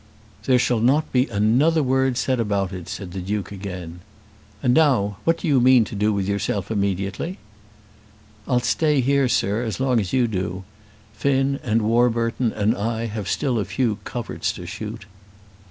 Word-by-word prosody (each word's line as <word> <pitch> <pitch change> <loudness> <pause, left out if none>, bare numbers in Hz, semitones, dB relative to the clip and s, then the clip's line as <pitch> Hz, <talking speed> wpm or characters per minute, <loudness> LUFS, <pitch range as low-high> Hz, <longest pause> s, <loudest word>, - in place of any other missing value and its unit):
"There 130 - +4
shall 125 -1 +1
not 135 +7 +2
be 130 +1 +2
another 125 +10 +2
word 130 -1 +1
said 130 0 0
about 100 -4 -1
it," 90 -3 -7
said 95 -3 -6
the 95 - -5
Duke 100 +2 -3
again. 90 -4 -7 0.6
"And 125 - +3
now 125 -10 +3
what 165 0 +3
do 170 - -4
you 140 -4 +4
mean 125 -1 +6
to 110 - -8
do 105 +1 +1
with 100 -2 -1
yourself 100 0 -2
immediately?" 100 - -2 1.1
"I'll 125 -1 +2
stay 150 +3 +2
here, 140 +1 +2
sir, 105 -1 +1
as 110 0 -4
long 130 -3 +2
as 95 -4 -3
you 130 -2 +3
do. 95 -3 -3 0.5
Finn, 140 +3 +1
and 115 -5 0
Warburton, 115 +1 +1
and 110 +2 +1
I 115 +2 -2
have 105 -3 -4
still 130 -5 0
a - - 0
few 105 +2 -1
coverts 120 +1 -3
to - - -9
shoot." 100 - -7
115 Hz, 170 wpm, -22 LUFS, 100-130 Hz, 1.1 s, mean